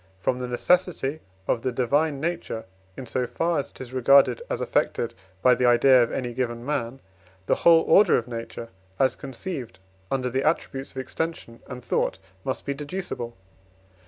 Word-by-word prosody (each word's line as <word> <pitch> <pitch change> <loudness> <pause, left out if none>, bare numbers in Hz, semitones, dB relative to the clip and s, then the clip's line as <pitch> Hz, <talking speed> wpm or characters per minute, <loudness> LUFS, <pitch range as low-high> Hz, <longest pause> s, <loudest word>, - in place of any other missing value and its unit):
from 125 +6 -1
the 125 - -3
necessity 155 +2 +1 0.3
of 115 - +1
the 130 - -1
divine 140 +4 +1
nature, 165 -8 -3 0.3
in 130 - -6
so 125 +1 -1
far 165 +2 0
as 140 - -4
it - - -18
is 130 -1 -8
regarded 135 - +5
as - - -2
affected 115 0 0 0.3
by 125 - +7
the 125 - +2
idea 125 +2 +6
of 120 - +1
any 125 -2 -3
given 120 -1 -3
man, 135 -3 -2 0.5
the - - +2
whole 165 -1 +7
order 200 -3 +5
of 120 - -3
nature 115 -1 -6 0.3
as 130 -2 +2
conceived 135 -1 -6 0.3
under 130 -2 0
the 135 +2 0
attributes 135 -4 -1
of - - -14
extension 130 -2 -4
and 125 -2 -8
thought - - 0 0.3
must 130 - -3
be 140 - -1
deducible. 145 - -5
130 Hz, 170 wpm, -25 LUFS, 120-150 Hz, 0.5 s, by